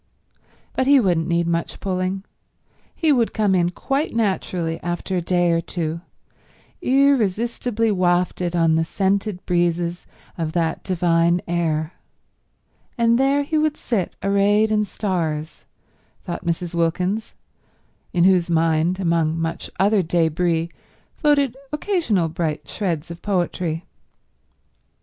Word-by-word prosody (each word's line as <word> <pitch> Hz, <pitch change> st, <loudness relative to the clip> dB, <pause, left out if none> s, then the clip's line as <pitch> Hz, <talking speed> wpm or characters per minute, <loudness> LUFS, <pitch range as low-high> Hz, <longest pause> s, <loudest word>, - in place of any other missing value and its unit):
But 260 Hz, -, 0 dB
he 280 Hz, 0 st, +7 dB
wouldn't 175 Hz, -7 st, +1 dB
need 170 Hz, 0 st, +1 dB
much 170 Hz, 0 st, -2 dB
pulling. 185 Hz, 0 st, -2 dB, 0.7 s
He 320 Hz, -3 st, +2 dB
would 240 Hz, -5 st, +1 dB
come 210 Hz, -3 st, +2 dB
in 175 Hz, -2 st, +3 dB
quite 275 Hz, -, -2 dB
naturally 185 Hz, -6 st, -1 dB
after 175 Hz, +2 st, -3 dB
a 180 Hz, -, +1 dB
day 175 Hz, 0 st, +2 dB
or 165 Hz, 0 st, +2 dB
two, 165 Hz, -1 st, -4 dB, 0.8 s
irresistibly 235 Hz, -, +2 dB
wafted 180 Hz, -1 st, +1 dB
on 165 Hz, -1 st, +3 dB
the 160 Hz, 0 st, +2 dB
scented 195 Hz, +2 st, -1 dB
breezes 175 Hz, 0 st, 0 dB, 0.3 s
of 160 Hz, -1 st, -2 dB
that 165 Hz, -2 st, -1 dB
divine 170 Hz, -1 st, +2 dB
air; 165 Hz, -2 st, -1 dB, 1.0 s
and 235 Hz, 0 st, +3 dB
there 275 Hz, +2 st, +3 dB
he 310 Hz, +2 st, 0 dB
would 305 Hz, -1 st, +1 dB
sit 210 Hz, -7 st, -2 dB
arrayed 205 Hz, +2 st, +3 dB
in 210 Hz, -1 st, +2 dB
stars, 165 Hz, -7 st, -3 dB, 0.6 s
thought 175 Hz, -3 st, -5 dB
Mrs. 170 Hz, 0 st, -2 dB
Wilkins, 180 Hz, +6 st, -1 dB, 0.8 s
in 175 Hz, -2 st, +2 dB
whose 180 Hz, -2 st, +4 dB
mind, 165 Hz, +2 st, +2 dB
among 165 Hz, -3 st, +1 dB
much 165 Hz, 0 st, -3 dB
other 205 Hz, +1 st, +4 dB
débris, 165 Hz, 0 st, 0 dB, 0.4 s
floated 285 Hz, -5 st, +2 dB, 0.2 s
occasional 300 Hz, -, 0 dB
bright 160 Hz, -2 st, -3 dB
shreds 170 Hz, -5 st, -3 dB
of 170 Hz, -, -9 dB
poetry. 175 Hz, -4 st, -1 dB
180 Hz, 120 wpm, -22 LUFS, 170-210 Hz, 1.0 s, he